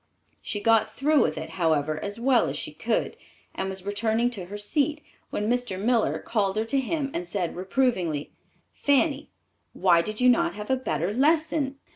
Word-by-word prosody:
She 205 - -4
got 220 0 +3
through 295 +1 +3
with 155 0 0
it, 160 - -5
however, 155 -1 +1
as 205 +2 -4
well 250 0 +3
as - - -3
she - - -5
could, - - -1 0.4
and 190 - -3
was 190 -1 -6
returning 220 +4 +1
to 195 -7 -6
her 200 +3 -7
seat 290 +8 -1 0.3
when 210 - -2
Mr. 245 -5 -1
Miller 230 +2 +2
called 205 -4 -1
her 220 +1 0
to 270 +5 +1
him 275 +1 -2
and 175 0 -3
said 175 -2 -2
reprovingly, 185 - 0 0.4
"Fanny, 285 +1 +1 0.4
why 175 -3 +4
did 215 +4 -6
you 250 - +4
not 245 -4 +3
have 210 +3 -5
a - - +4
better 175 - -2
lesson?" 295 +1 +1
220 Hz, 180 wpm, -26 LUFS, 190-265 Hz, 0.4 s, why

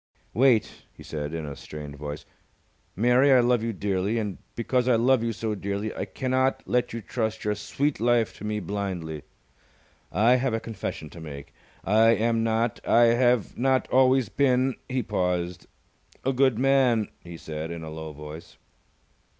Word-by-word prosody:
"Wait!" 120 -2 +2
he - - -14
said, 75 -1 -5
in 80 -1 -4
a 70 -1 -6
strained 75 -1 -9
voice. 75 0 -7 0.7
"Mary, 125 +6 +4
I 130 - +7
love 120 -1 +3
you 115 +1 -1
dearly, 100 +1 -1
and 105 -4 -3 0.2
because 125 +1 0
I 125 - +5
love 125 +2 +3
you 115 0 -1
so 110 -1 -3
dearly 100 +1 -3
I - - -3
cannot 130 0 0
let 125 0 0
you 115 - -5
trust 110 +1 -3
your 105 - +1
sweet 140 +7 -2
life 120 -1 +2
to - - -10
me 105 0 -2
blindly. 90 -5 -4 0.9
I 115 +8 +4
have 125 -2 0
a - - -1
confession 100 -9 -6
to 85 - -11
make, 70 -3 -9 0.3
I 110 +3 +5
am 115 0 +1
not 115 0 0
I 115 0 +5
have 120 -2 +2
not 130 +1 +2
always 130 -1 +4
been" 130 -1 +2 0.2
he 130 -1 -1
paused 90 -3 -2 0.6
"a 135 - +2
good 130 -3 +3
man," 125 -4 +3
he 85 -1 -9
said, 80 0 -6
in 85 -1 -6
a 80 - -7
low 80 0 -6
voice. 75 +2 -10
110 Hz, 170 wpm, -26 LUFS, 90-125 Hz, 0.9 s, I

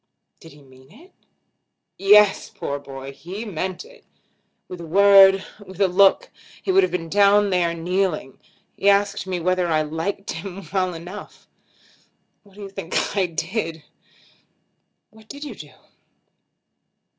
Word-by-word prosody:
"Did 165 - -15
he 145 0 -18
mean 130 +1 -20
it?" 320 - -19 0.8
"Yes; 205 0 +4
poor 140 0 -5
boy! 135 -1 -9
He 185 +10 -8
meant 185 - -5
it. - - -18 0.6
With 180 -1 -9
a - - -8
word; 195 +1 +6 0.2
with 190 -2 -13
a 195 - +4
look, 195 - +3 0.3
he 380 - -2
would 385 +1 +5
have 370 - 0
been 165 -2 -3
down 205 +2 +3
there 175 -2 +1
kneeling. 175 -4 -2 0.4
He 200 - +2
asked 200 -1 +1
me 185 -1 -2
whether 180 +1 0
I 155 -2 +1
liked 165 +6 -4
him 185 +3 -8
well 185 -2 0
enough. 175 +5 -11 0.9
What 200 -2 -23
do 205 - -10
you 195 - -8
think 195 -1 -3
I 195 -3 +1
did?" 165 -1 -4 1.3
"What 220 0 -20
did 285 +1 -9
you 290 -5 -7
do?" 150 -7 -13
190 Hz, 145 wpm, -22 LUFS, 165-200 Hz, 1.3 s, word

